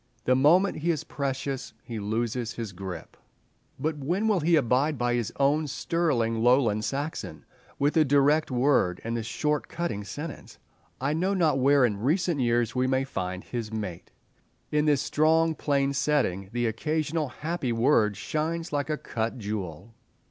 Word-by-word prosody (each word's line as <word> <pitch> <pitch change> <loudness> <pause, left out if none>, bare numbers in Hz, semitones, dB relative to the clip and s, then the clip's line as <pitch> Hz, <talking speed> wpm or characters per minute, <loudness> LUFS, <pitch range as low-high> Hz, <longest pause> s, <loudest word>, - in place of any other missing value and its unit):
The 130 - +4
moment 170 +9 +4
he 165 +3 -2
is 160 -4 0
precious 135 -1 -4
he 115 -2 -6
loses 115 +3 -2
his 115 -4 -5
grip. 90 -2 -8 0.6
But 155 -1 -2
when 175 +9 -1
he 220 - +2 0.2
will - - +7
abide 135 +3 +2
by 120 0 0
his 120 -3 -1
own 145 +3 +2
sterling 130 -7 0
Lowland 120 -3 +3
Saxon, 145 +6 -4 0.3
with 145 +2 +2
the 160 - +5
direct 145 +2 +3
word 125 -8 +2
and 115 +1 -3
the 115 - -1
short, 150 +6 -1
cutting 140 -13 -3
sentence, 145 +10 -8 0.4
I 140 +3 0
know 185 +5 0
not 160 -7 +2
where 140 0 +5
in 105 -4 -1
recent 160 - +1
years 120 -2 +1
we 125 0 +1
may 130 0 +1
find 95 -8 -4
his 115 -3 -5
mate. 95 -6 -5 0.6
In 150 0 +2
this 145 -3 +3
strong, 160 +2 +3
plain 140 -2 0
setting 130 -10 0
the 120 0 -1
occasional 155 +6 -1
happy 150 0 -3
word 115 -3 +3
shines 165 +1 -3
like 145 +1 -1
a 155 - 0
cut 115 -2 -3
jewel. 100 -2 -5
135 Hz, 165 wpm, -27 LUFS, 115-150 Hz, 0.6 s, will